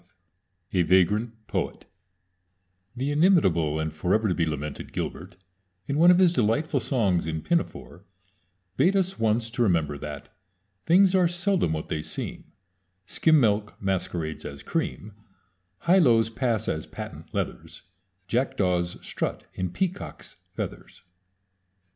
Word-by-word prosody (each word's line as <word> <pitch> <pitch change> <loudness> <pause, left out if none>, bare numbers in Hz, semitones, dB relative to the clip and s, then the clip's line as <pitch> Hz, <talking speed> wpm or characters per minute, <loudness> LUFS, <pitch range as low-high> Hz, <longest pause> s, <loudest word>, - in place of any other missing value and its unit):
V - - 0
A - - +5
VAGRANT 105 +6 +2
POET - - -3 1.1
The 135 +3 -1
inimitable 95 - +3
and 80 -1 -2
forever 95 +8 +1
to 95 - +1
be 85 -2 0
lamented 75 -1 -5
Gilbert, 90 +2 -5 0.5
in 140 +5 -1
one 170 +2 +7
of 180 - +7
his 180 -2 +5
delightful 120 +4 +1
songs 100 - 0
in 80 -1 -3
Pinafore, 170 - -2 0.7
bade 190 +3 +4
us 190 0 0
once 115 +1 +1
to 120 - -3
remember 80 -9 +1
that 75 -1 -8 0.5
Things 185 +2 +5
are 185 -2 +4
seldom 175 - +1
what 80 - -4
they 75 - -2
seem - - -5 0.5
Skim 160 - +3
milk 105 -3 +1
masquerades 90 -5 -2
as 70 -1 -8
cream; 105 +1 -3 0.7
Highlows 125 -11 +4
pass 115 -3 -1
as 80 - -2
patent - - -9
leathers; - - -4 0.4
Jackdaws 90 -7 0
strut - - -3
in 95 -1 -2
peacock's 185 - -4 0.2
feathers. - - -7
110 Hz, 130 wpm, -26 LUFS, -, 1.1 s, one